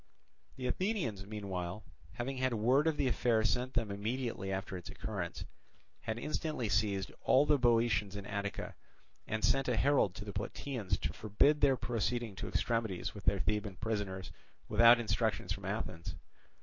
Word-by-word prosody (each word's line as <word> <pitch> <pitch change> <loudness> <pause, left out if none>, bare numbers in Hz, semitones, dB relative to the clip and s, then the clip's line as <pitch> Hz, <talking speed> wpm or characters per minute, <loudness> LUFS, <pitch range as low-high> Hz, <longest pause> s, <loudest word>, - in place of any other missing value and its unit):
The 130 - -6
Athenians 130 - -1
meanwhile, 100 -2 -4 0.3
having 125 +5 -3
had 130 -2 +1
word 130 +8 +3
of 160 -2 +1
the 135 - +2
affair 115 -2 +2
sent 125 +4 0
them 115 -4 0
immediately 110 -1 -2
after 95 0 -3
its 90 -1 -7
occurrence, 90 -6 -4 0.5
had 110 - -3
instantly 150 -3 -2
seized 100 0 +1
all 140 +3 +5
the 150 -1 +4
Boeotians 115 -5 +3
in 100 -1 -5
Attica, 100 -1 -3 0.5
and 110 0 -2
sent 135 0 +3
a 125 -3 +1
herald 135 -10 +3
to 100 +5 -7
the 100 - -6
Plataeans 120 -9 -2
to - - -2
forbid 125 +8 +2
their 135 -2 +5
proceeding 120 -1 -1
to - - -4
extremities 115 -6 -1
with 100 -3 -10
their 100 - +3
Theban 105 +1 -1
prisoners 100 -2 -3 0.4
without 115 +1 +7
instructions 110 -3 0
from 100 -1 -8
Athens. 95 -4 -4
110 Hz, 160 wpm, -34 LUFS, 100-125 Hz, 0.5 s, without